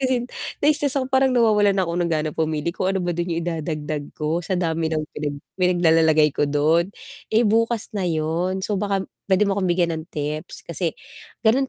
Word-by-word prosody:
kasi 255 -2 +1 0.4
na-istress 290 -2 +3
ako 265 0 -1
parang 265 0 +4
nawawalan 210 -4 +4
na 190 - +2
ako 170 - -3
ng 170 - +1
gana 155 -1 0
pumili 160 +1 -1
kung 185 - -1
ano 190 -2 0
ba 175 - 0
dun 175 +1 -2
yung 165 0 -2
idadagdag 155 -3 -4
ko, 155 +3 -1
sa 180 +2 -2
dami 165 -2 0
ng 155 -1 -1
pinag 145 -1 -3 0.2
pinaglalalagay 160 -4 +4
ko 145 - 0
dun. 155 +5 +2 0.4
Eh 225 +2 +3
bukas 230 +1 +1
na 190 -4 -1
yun, 170 +4 -1
so 205 -3 -1
baka 195 -2 0 0.2
pwede 190 +2 +4
mo 200 - +1
akong 185 - 0
bigyan 175 -1 +2
ng 160 0 -4
tips 150 0 -5
kasi, 170 0 -3 0.5
gano'n 260 +5 +3
175 Hz, 195 wpm, -23 LUFS, 160-205 Hz, 0.5 s, parang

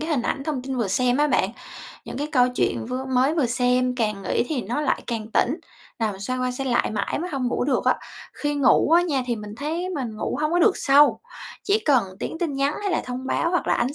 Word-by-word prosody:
cái 315 +2 -3
hình 280 -6 +1
ảnh, 270 - -2
thông 285 -5 -2
tin 265 0 -4
vừa 230 -5 0
xem 245 +5 +2
á 295 +1 +3
bạn, - - +1 0.5
những - - -7
cái 290 - -1
câu 250 -3 +4
chuyện - - 0
vưa 255 +2 -3
mới 265 +3 +2
vừa 300 -6 +2
xem, 250 +1 +1
càng 210 -4 -1
nghĩ 190 - 0
thì 275 -7 -1
nó 240 +9 -2
lại 295 - 0
càng 225 -3 -3
tỉnh, 275 +7 +2 0.4
nằm 215 -4 -1
xoay 255 +6 -2
qua 255 - 0
xoay 260 +1 -3
lại 240 - +2
mãi 210 +4 -2
mới 355 +3 -4
hông 270 -3 -2
ngủ 245 - -1
được 265 -1 0
á. - - +3 0.4
Khi 290 0 -2
ngủ 285 +2 +4
á 345 +1 +6
nha, 290 -7 0
thì 240 -2 -1
mình 210 -1 -8
thấy 320 +6 -3
mình 240 -7 -4
ngủ - - -2
hông 305 +1 0
có 350 - +3
được 390 +2 +4
sâu, 285 +1 +4 0.4
chỉ 410 +2 +2
cần 285 - +3 0.2
tiếng 320 - -4
tin 330 -4 -1
nhắn 275 +2 +1
hay 400 - -1
là - - +1
thông 255 +1 -5
báo, 335 - 0
hoặc 355 - 0
là - - +3
ánh 250 +4 -1
260 Hz, 260 wpm, -24 LUFS, 245-300 Hz, 0.5 s, á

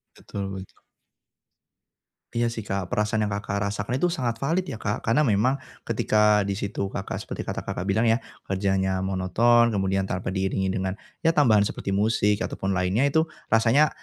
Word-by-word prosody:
Betul 100 -1 -6
betul. 95 -1 -9 1.5
Iya 120 0 +1
sih 115 - -4
Kak, 95 -2 -3
perasaan 105 0 +1
yang 105 - -3
Kakak, 100 0 -3 0.2
rasakan 105 +5 -2
itu 160 - +1
sangat 120 -8 -2
valid 160 +9 0
ya - - -5
Kak. 105 0 -2
Karena 125 +7 +2
memang 120 +4 +2 0.2
ketika 105 -1 +2
di 100 - -1
situ 100 0 -3
Kakak, 95 0 -4
seperti - - -5
kata - - -5
Kakak, 95 +3 -3
bilang 110 +4 +2
ya 115 +2 +3 0.2
kerjanya 95 -1 0
monoton, 110 +5 +3
kemudian 95 -1 0
tanpa 95 -1 -3
diiringi 95 0 -1
dengan, 95 0 -1 0.3
ya 165 - +5
tambahan 110 -10 +4
seperti 100 - -4
musik 105 +1 +2
ataupun 95 - -4
lainnya, 95 +5 +1
itu 160 +3 +2 0.2
rasanya, 115 +7 +4
105 Hz, 165 wpm, -25 LUFS, 95-115 Hz, 1.5 s, ya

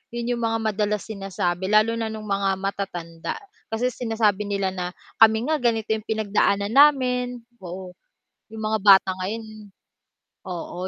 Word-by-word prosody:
'yon 240 0 -2
'yong - - -5
mga 225 -1 0
madalas 210 0 -1
sinasabi 190 -3 -3
lalo 215 +3 +3
na 225 - -1
no'ng 220 -1 -6
mga 200 -1 0
matatanda. 190 -4 -4 0.3
Kasi 240 +3 -1
sinasabi 220 -4 0
nila 200 -2 -1
na, 180 -1 -5 0.2
"Kami 225 +5 +5
nga 310 - +1
ganito 225 -3 0
'yong 220 -1 -2
pinagdaanan 205 -1 +1
namin." 250 -3 +3 0.2
Oo. 185 0 -8 0.6
"'Yong 220 0 -7
mga 215 0 0
bata 195 -2 +7
ngayon" 215 +2 -6 0.8
Oo, 180 0 -5
215 Hz, 145 wpm, -24 LUFS, 195-225 Hz, 0.8 s, bata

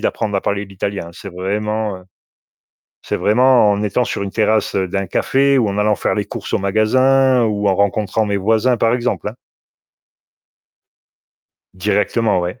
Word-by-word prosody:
d'apprendre 105 - -2
à 95 - 0
parler 100 0 -2
l'italien 100 -2 -5
hein. - - -11
C'est 100 - -10
vraiment, 105 +2 -2
heu, 90 - -17 1.0
c'est - - -3
vraiment 120 0 +4
en 100 0 0
étant 115 +4 0
sur 105 - -4
une 100 - -6
terrasse 110 -1 +1
d'un 95 0 -1
café 135 +8 +2
ou 115 -4 +1
en 100 +1 -3
allant 105 0 +2
faire - - -1
les 105 - -1
courses 100 - -7
au - - +2
magasin 130 +6 +3
ou 105 -2 0
en 95 - +2
rencontrant 100 +2 0
mes 100 -1 -1
voisins, 110 +5 +1
par 115 0 +1
exemple, 125 -3 -2
hein. 105 - -8 2.4
Directement, 105 +2 0
ouais. 90 +7 -5
105 Hz, 165 wpm, -18 LUFS, 100-115 Hz, 2.4 s, vraiment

